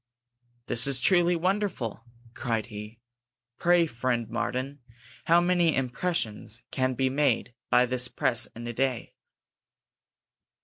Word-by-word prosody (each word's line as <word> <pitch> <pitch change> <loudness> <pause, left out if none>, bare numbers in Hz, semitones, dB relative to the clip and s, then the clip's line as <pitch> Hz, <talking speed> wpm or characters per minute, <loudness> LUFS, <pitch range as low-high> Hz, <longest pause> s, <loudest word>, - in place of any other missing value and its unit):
"This 120 +3 +4
is 135 -2 +1
truly 175 +4 +3
wonderful," 180 - -2 0.3
cried 115 -3 -2
he. 105 +2 -8 0.6
"Pray, 175 -1 +4
friend 120 -4 -2
Martin, 130 +5 -3 0.5
how 170 +1 +5
many 175 -2 +2
impressions 120 - -2
can 130 -1 0
be 130 +2 +1
made 135 -4 +1 0.2
by 125 - +5
this 125 0 +2
press 120 -1 0
in 120 +1 -8
a 120 - -4
day?" 130 0 -2
130 Hz, 120 wpm, -27 LUFS, 115-165 Hz, 0.6 s, how